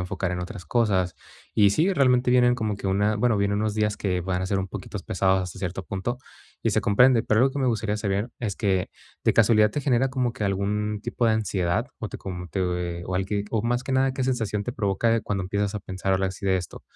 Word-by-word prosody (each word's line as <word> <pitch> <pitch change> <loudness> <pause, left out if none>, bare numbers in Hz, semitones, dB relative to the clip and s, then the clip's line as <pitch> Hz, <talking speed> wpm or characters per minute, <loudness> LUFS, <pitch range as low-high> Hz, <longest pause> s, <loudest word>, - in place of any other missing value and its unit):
enfocar 90 +1 -3
en 90 - -3
otras 90 0 -7
cosas". 95 -7 +1 0.4
Y 100 -2 +5
sí, 160 - +2
realmente, 125 -5 +3
vienen 125 -1 +5
como 110 -4 -2
que 100 - -6
una 105 +3 +2
bueno, 115 0 +2
vienen 100 0 +1
unos 105 -1 -1
días 105 -1 0
que 90 -4 -1
van 90 +1 -2
a - - -1
ser 100 0 0
un 95 - -4
poquitos - - -6
pesados, 95 -1 +1
hasta 90 -2 -7
cierto 95 0 -4
punto, 120 +6 -3 0.4
y - - +2
se - - +2
comprende. 120 +3 +5
Pero 110 +1 +2
algo 135 - +4
que 145 - -4
me 130 - +1
gustaría 110 -3 0
saber 100 +2 -1
es 105 -5 -3
que, 95 -4 0 0.4
¿de - - +4
casualidad 110 -1 +5
te 145 - -2
genera 135 -1 +2
como 125 -2 0
que 105 - -4
algún 105 +2 -1
tipo 120 0 -2
de 110 - +4
ansiedad 95 -5 0
o - - -4
te - - -8
como 90 -2 -6
te 95 - -3
o 90 -1 -2
o 90 - -1
al 95 +1 +1
que 100 0 -1
o 110 -2 0
más 120 +1 0
que 135 - -4
nada, 130 0 +2
qué 130 -1 -2
sensación 110 -5 -1
te 125 - -4
provoca 110 +2 +1
cuando 100 -2 -2
empiezas 100 +2 -1
a 105 - -3
pensar 95 0 -3
ahora 95 0 +1
sí, 95 - -10
de 95 -1 +3
esto? 90 - -8
105 Hz, 250 wpm, -25 LUFS, 95-120 Hz, 0.4 s, Y